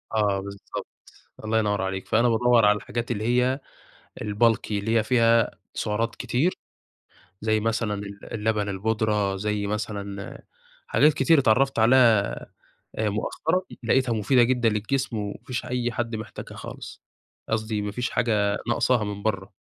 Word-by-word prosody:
آه 100 -2 +2
بالضبط، 100 0 -7 0.6
الله 110 +1 +2
ينوّر 105 -2 0
عليك، 95 0 -3
فأنا 120 +2 +3
بادوّر 120 -1 +4
على 105 - +5
الحاجات 120 +3 -4
اللي 105 -2 -2
هي 125 +3 +2 0.7
الbulky 110 +2 +1
اللي 105 +3 0
هي - - +2
فيها 115 -2 +3 0.2
سعرات 115 +2 -1
كتير، 155 +9 0 0.9
زي 110 0 +1
مثلًا 110 -1 0
ال 100 0 -8
اللبن 105 -1 0
البودرة، 105 0 0
زي 105 +1 -2
مثلًا 100 -1 -5 0.4
حاجات 150 0 +4
كتير 165 +1 +4
اتعرّفت 135 +1 +3
عليها 115 -3 +5 0.7
آآ 110 -1 +1
مؤخرًا، 160 - -1 0.2
لقيتها 125 +1 +2
مفيدة 120 +4 +3
جدًا 120 -1 +2
للجسم، 115 +4 -1
وما 105 -1 -3
فيش 125 -2 -3
أي 125 -1 -1
حد 115 0 -2
محتاجها 110 -1 -8
خالص، - - -9 0.5
قصدي 110 -1 -1
ما 105 0 -3
فيش 125 +3 -2
حاجة 105 -4 +1
ناقصاها 120 -1 +2
من 100 -1 -5
برّه. 100 -2 -2
110 Hz, 145 wpm, -25 LUFS, 105-120 Hz, 0.9 s, على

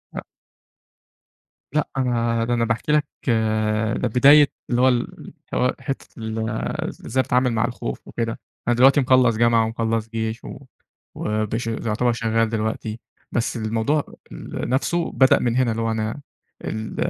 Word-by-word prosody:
أ - - -3 1.5
لأ، 150 0 +1
أنا 115 -3 +1
ده 120 - 0
أنا 115 -1 +1
باحكي 115 +6 -1
لك 150 -1 +3 0.9
ده 125 - 0
بداية 140 +5 +7 0.2
اللي 120 0 +1
هو 130 - +6
ال 120 -2 +1
اللي - - -11 0.3
هو 125 - +2
حِتّة 135 +1 -5
ال 110 0 -3 0.6
إزاي 130 +3 +1
بتتعامل 125 0 +2
مع 110 +1 +1
الخوف 65 - -5
وكده، 115 -1 -3 0.3
أنا 120 - +3
دلوقتي 135 +4 +6
مخلّص 130 -3 +4
جامعة 115 -1 +4
ومخلّص 115 0 -2
جيش، 110 0 -3
و - - -8 0.6
وبش 110 +2 -2
يعتبر 115 +1 0
شَغّال 115 -1 +1
دلوقتي، 110 0 -3 0.3
بس 120 +1 -1
الموضوع 115 +7 0 0.3
ال - - -6
نفسُه 165 +6 0
بدأ 130 -1 +4
من 120 -1 0
هنا، 125 -3 +2
اللي 115 +1 -2
هو 115 - 0
أنا 110 +5 -3 0.4
ال 110 0 -4
115 Hz, 150 wpm, -22 LUFS, 110-125 Hz, 1.5 s, بداية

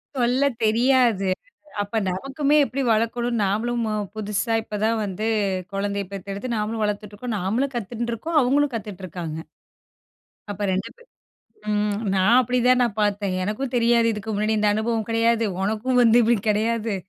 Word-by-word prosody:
சொல்ல 250 +2 +2 0.2
தெரியாது. 230 -3 +3 0.5
அப்ப 205 +2 -3
நமக்குமே 275 +9 0
எப்டி 265 +4 -3
வளர்க்கணும் 235 +1 0
நாமளும் 230 +4 0
மு 215 - -2 0.2
புதுசா 210 +1 -2
இப்ப 215 -1 -6
தான் 225 +1 +2
வந்து 205 +2 -4 0.5
கொழந்தைய 200 0 -2
பெத்தெடுத்து 200 +4 -6
நாமளும் 215 +1 -2
வளர்த்துட்ருக்கோம், 210 +2 -3
நாமளும் 240 +9 -1
கத்துண்டுருக்கோம், 235 - -3
அவங்களும் 280 +1 +2
கத்துட்ருக்காங்க. 185 -7 -6 1.1
அப்ப 205 +1 -3
2 190 +1 -2
பேர் 480 0 -21 0.6
ம் 210 0 0 0.2
நான் 200 +6 +4
அப்டி 250 +1 0
தான் 255 0 +5
நான் 235 -4 0
பார்த்தேன். 200 -2 0
எனக்கும் 240 +7 -3
தெரியாது 235 -1 +3
இதுக்கு 215 +1 -5
முன்னாடி 215 +2 0
இந்த 210 0 +2
அனுபவம் 220 0 -1
கடையாது. 230 0 +2 0.2
ஒனக்கும் 220 +5 0
வந்து 230 0 +5
இப்டி 230 +1 +3
கெடையாது 220 0 0
220 Hz, 140 wpm, -23 LUFS, 205-240 Hz, 1.1 s, தான்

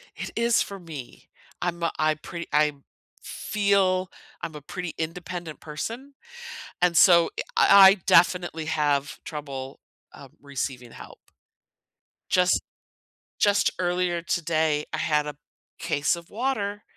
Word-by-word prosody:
It - - -6
is 235 0 +2
for 200 -1 -5
me. 155 -8 -10 0.3
I'm 170 -1 -2
a 170 - +1
I 155 0 +3
pretty 170 +2 -8
I'm 150 -2 +2 0.4
feel 195 -3 0 0.3
I'm 160 - -5
a 150 - -8
pretty 175 +3 -6
independent 170 0 -5
person, 230 - -6 0.7
and 175 -1 +3
so, 170 -2 +6
eh - - 0
I 195 -1 +8
I - - +4
definitely 175 -2 +3
have 145 -2 0
trouble, 140 -3 -7 0.3
um, 140 -2 -13
receiving 130 -3 -5
help. - - -12 1.1
Just 180 0 +3 0.8
just 205 -1 +3
earlier 175 -1 0
today, 160 -3 0
I - - -1
had 150 -1 +1
a 150 - -6 0.4
case 145 +4 0
of 170 -1 -12
water 210 -4 -2
170 Hz, 125 wpm, -25 LUFS, 150-185 Hz, 1.1 s, I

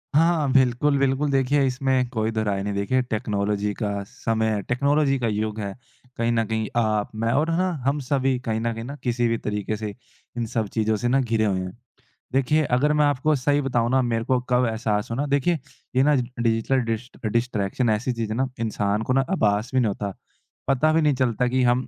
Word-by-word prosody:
हाँ 160 -3 +3
बिल्कुल, 130 +2 +3
बिल्कुल 140 +2 +1
देखिए 135 +1 +2
इसमें 130 -1 +1
कोई 110 -2 -1
दो 110 -1 -1
राय 100 -2 -1
नहीं 100 0 -2
देखिए 100 +6 +1
टेक्नोलॉज़ी 105 -3 -1
का 105 -2 0 0.2
समय 110 -1 -1
टेक्नोलॉज़ी 140 +2 +2
का 120 - 0
युग 110 0 -2
है 100 -2 -4 0.4
कहीं 115 0 +1
न 115 -1 +2
कहीं 110 -1 -1
आप 110 -2 +1
मैं 115 +1 0
और 155 +5 +1
है 165 - +1
ना 185 +1 +2 0.2
हम 140 +2 +1
सभी 135 0 +1
कहीं 110 -1 0
न 115 +1 -1
कहीं 115 0 -6
ना 140 +4 -6
किसी 120 -1 +1
भी 115 - +1
तरीक़े 105 0 -3
से 105 -1 -5 0.4
इन 120 - -1
सब 110 -1 -2
चीज़ों 110 -1 +1
से 120 - -1
ना 130 +3 +3
घिरे 115 -4 +1
हुए 95 -2 +1
हैं। 95 +4 -6 0.6
देखिए 135 +4 +2
अगर 150 +4 +2
मैं 150 0 +3
आपको 145 +2 +2
सही 145 +2 +1
बताऊँ 120 -4 0
ना 130 0 +4
मेरे 115 -2 0
को 130 0 +2
कब 125 0 +3
एहसास 110 -1 -1
हुआ 115 - -2
ना 145 - 0
देखिए 145 +4 +1 0.4
ये 130 - +5
ना 150 +1 +4
डिजिटल 120 0 0
डिस्ट 115 +1 -6
डिस्ट्रैक्शन 115 0 0
ऐसी 110 +4 0
चीज़ 115 -2 -3
है - - -1
ना 130 +1 +1
इंसान 105 -2 0
को 130 - +4
ना 135 0 +2
आभास 110 - +1
भी 130 - +3
नहीं 120 - +2
होता 100 -1 -3 0.5
पता 135 +4 +3
भी 165 - +3
नहीं 150 -2 +3
चलता 125 -1 +1
कि 130 +1 +1
हम 125 +1 +2
120 Hz, 215 wpm, -24 LUFS, 110-135 Hz, 0.6 s, ये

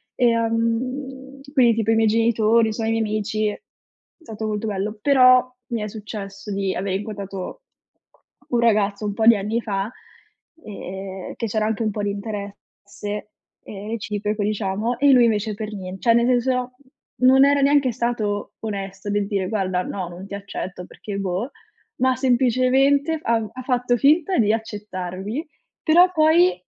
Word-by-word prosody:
Ehm, 255 +4 -1
quindi 240 -5 +5
tipo 225 0 +1
i - - +4
miei 225 0 +3
genitori, 225 0 +3
so 225 - -4
i 225 - 0
miei 225 0 +1
amici 215 0 -1
è - - -7 0.6
stato 220 -8 -6
molto 210 +1 -2
bello. 210 +1 -3
Però 255 -1 +5 0.3
mi 225 - -1
è 210 - -3
successo 205 -1 -7
di 195 -1 -1
aver 190 0 -2
incontrato 200 - -6 0.9
un 240 - +1
ragazzo 210 -2 +2
un 205 - -2
po' 220 +1 0
di 230 -2 +7
anni 215 +4 -2
fa, 200 -1 -2 0.8
ehm, 190 -2 -7
che 230 - -3
c'era 215 +1 0
anche 220 +1 -1
un 215 - 0
po' 205 0 -4
di 205 - 0
interesse, 205 0 -7 0.3
ehm, 205 0 -9
reciproco, 210 -1 -2
diciamo, 210 +3 -1
e 285 -1 +5
lui 250 -2 +6
invece 215 -1 0
per 215 +1 -6
nien 190 -1 -6
cioè, 235 - +4
nel 235 0 +3
senso, 250 0 0 0.5
non 265 +2 +7
era 285 0 +3
neanche 275 -2 +3
stato 215 -4 -2
onesto 195 -2 -5
del 205 -1 0
dire: 195 -3 -1
"Guarda, 185 -4 -1
no, 185 -3 -5
non 180 +3 -9
ti 200 - -10
accetto 185 -2 -6
perché", 205 +1 -8
boh, 195 +6 -2 0.5
ma 260 0 +3
semplicemente 265 +4 +3
f - - -25
ha 225 -2 0
ha 255 - -7
fatto 245 -1 +1
finta 315 - +3
di 215 -2 +3
accettarmi, 210 - -5 0.4
però 355 +3 +5
poi 330 +3 +4
220 Hz, 160 wpm, -22 LUFS, 200-250 Hz, 0.9 s, di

